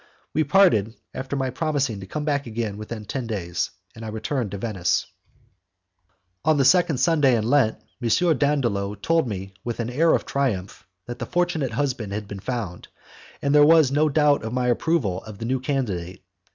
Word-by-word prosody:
We 155 Hz, -, +2 dB
parted, 140 Hz, -, +4 dB, 0.2 s
after 135 Hz, +1 st, -4 dB
my 135 Hz, -2 st, -1 dB
promising 135 Hz, -6 st, -1 dB
to 95 Hz, -, -9 dB
come 150 Hz, +9 st, -4 dB
back 140 Hz, -3 st, 0 dB
again 110 Hz, -2 st, -3 dB
within 110 Hz, 0 st, -7 dB
ten 125 Hz, +2 st, -4 dB
days, 90 Hz, -6 st, -2 dB, 0.2 s
and 115 Hz, -1 st, -10 dB
I -, -, -5 dB
returned 110 Hz, +2 st, -2 dB
to 100 Hz, -, -5 dB
Venice. 95 Hz, -4 st, 0 dB, 1.4 s
On 155 Hz, 0 st, +3 dB
the 135 Hz, -, +3 dB
second 170 Hz, 0 st, +4 dB
Sunday 145 Hz, -4 st, +3 dB
in 110 Hz, 0 st, -1 dB
Lent, 130 Hz, -4 st, +3 dB, 0.2 s
M. 155 Hz, +7 st, +2 dB
Dandolo 120 Hz, -9 st, 0 dB
told 165 Hz, -, +1 dB
me 95 Hz, -2 st, -5 dB
with 120 Hz, -1 st, -4 dB
an 115 Hz, +1 st, -2 dB
air 160 Hz, +6 st, +4 dB
of -, -, -2 dB
triumph 110 Hz, -12 st, -2 dB, 0.2 s
that 120 Hz, 0 st, -7 dB
the -, -, -4 dB
fortunate 175 Hz, -7 st, 0 dB
husband 125 Hz, -8 st, -2 dB
had 105 Hz, 0 st, -4 dB
been 100 Hz, -1 st, -7 dB
found, 110 Hz, -6 st, -5 dB, 0.6 s
and 140 Hz, 0 st, +2 dB
that 150 Hz, -, +7 dB
there 145 Hz, -, +7 dB
was 160 Hz, -4 st, +6 dB
no 150 Hz, +2 st, +3 dB
doubt 150 Hz, 0 st, +3 dB
of 110 Hz, +1 st, -4 dB
my 125 Hz, -1 st, +1 dB
approval 120 Hz, -, 0 dB
of 110 Hz, -2 st, -9 dB
the 115 Hz, -, -5 dB
new 130 Hz, +2 st, 0 dB
candidate. 100 Hz, -10 st, -3 dB
125 Hz, 190 wpm, -24 LUFS, 105-145 Hz, 1.4 s, that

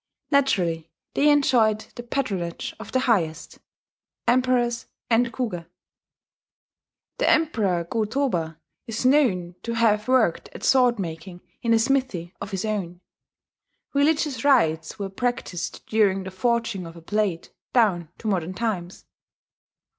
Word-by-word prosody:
Naturally 180 Hz, -, +1 dB, 0.2 s
they 295 Hz, -, +4 dB
enjoyed 240 Hz, -7 st, +4 dB
the -, -, -7 dB
patronage 200 Hz, -9 st, -3 dB
of -, -, -9 dB
the 260 Hz, -, +1 dB
highest, 175 Hz, -11 st, 0 dB, 0.7 s
emperors 245 Hz, -1 st, +2 dB, 0.2 s
and 235 Hz, +1 st, +3 dB
Kuge. 220 Hz, -10 st, -4 dB, 1.5 s
The -, -, +3 dB
Emperor 215 Hz, -, +2 dB
Go 215 Hz, +6 st, -1 dB
Toba 180 Hz, -, -1 dB, 0.3 s
is 225 Hz, +2 st, -3 dB
known 235 Hz, -11 st, +3 dB
to 230 Hz, -, -3 dB
have 215 Hz, -2 st, +2 dB
worked 255 Hz, -9 st, +2 dB
at -, -, -10 dB
sword 250 Hz, -3 st, +4 dB
making 175 Hz, -1 st, -6 dB, 0.2 s
in 230 Hz, -, 0 dB
a 230 Hz, -, +6 dB
smithy 225 Hz, -8 st, 0 dB
of 200 Hz, -, -5 dB
his 190 Hz, 0 st, -3 dB
own. 190 Hz, -5 st, -3 dB, 0.9 s
Religious 285 Hz, -3 st, +1 dB
rites 165 Hz, -, +2 dB
were 200 Hz, -, -3 dB
practised 220 Hz, -6 st, -3 dB
during 200 Hz, -3 st, +2 dB
the 190 Hz, -, -7 dB
forging 230 Hz, -2 st, -1 dB
of 165 Hz, -, -11 dB
a 170 Hz, -, -11 dB
blade 195 Hz, -1 st, -1 dB, 0.2 s
down 190 Hz, -9 st, +2 dB
to 220 Hz, -, -7 dB
modern 185 Hz, -3 st, -1 dB
times.... 190 Hz, -5 st, -3 dB
215 Hz, 130 wpm, -24 LUFS, 175-245 Hz, 1.5 s, a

